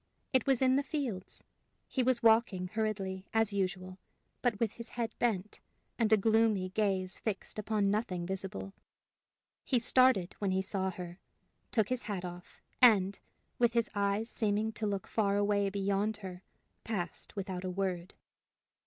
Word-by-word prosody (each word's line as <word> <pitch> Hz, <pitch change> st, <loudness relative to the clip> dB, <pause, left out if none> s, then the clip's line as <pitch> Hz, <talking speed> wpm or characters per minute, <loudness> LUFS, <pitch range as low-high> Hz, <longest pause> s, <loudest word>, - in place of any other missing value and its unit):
It 260 Hz, -1 st, +3 dB
was 265 Hz, -1 st, +3 dB
in 260 Hz, 0 st, +4 dB
the -, -, +3 dB
fields. 270 Hz, -, -4 dB, 0.4 s
He 260 Hz, -, 0 dB
was 250 Hz, -1 st, +2 dB
walking 220 Hz, -5 st, +4 dB
hurriedly, 195 Hz, -3 st, -2 dB
as 225 Hz, -2 st, +3 dB
usual, 185 Hz, -1 st, -2 dB, 0.4 s
but 235 Hz, -5 st, +1 dB
with 230 Hz, -3 st, +1 dB
his 235 Hz, +1 st, -9 dB
head 235 Hz, -2 st, -3 dB
bent, 215 Hz, -4 st, 0 dB, 0.4 s
and 225 Hz, -2 st, +2 dB
a 220 Hz, -, +7 dB
gloomy 220 Hz, -3 st, +3 dB
gaze 190 Hz, -2 st, -1 dB
fixed 215 Hz, 0 st, -4 dB
upon 210 Hz, -1 st, +1 dB
nothing 190 Hz, -5 st, -1 dB
visible. 195 Hz, +1 st, -4 dB, 0.9 s
He 255 Hz, -, +2 dB
started 240 Hz, -6 st, +4 dB
when 200 Hz, -, 0 dB
he 190 Hz, 0 st, +1 dB
saw 190 Hz, -1 st, -1 dB
her, 180 Hz, 0 st, -7 dB, 0.5 s
took 220 Hz, -3 st, +1 dB
his 255 Hz, -1 st, -1 dB
hat 185 Hz, -3 st, -2 dB
off, 175 Hz, 0 st, -10 dB, 0.2 s
and, 200 Hz, -5 st, +6 dB, 0.4 s
with 240 Hz, -1 st, +4 dB
his 235 Hz, -1 st, +1 dB
eyes 200 Hz, +2 st, 0 dB
seeming 215 Hz, -1 st, 0 dB
to 215 Hz, 0 st, -3 dB
look 200 Hz, -2 st, -2 dB
far 200 Hz, -2 st, +1 dB
away 205 Hz, -1 st, +2 dB
beyond 200 Hz, +2 st, 0 dB
her, 180 Hz, -1 st, -7 dB, 0.4 s
passed 195 Hz, -6 st, -4 dB
without 190 Hz, -2 st, -4 dB
a 185 Hz, -, -2 dB
word. 185 Hz, -1 st, -3 dB
205 Hz, 155 wpm, -32 LUFS, 190-225 Hz, 0.9 s, a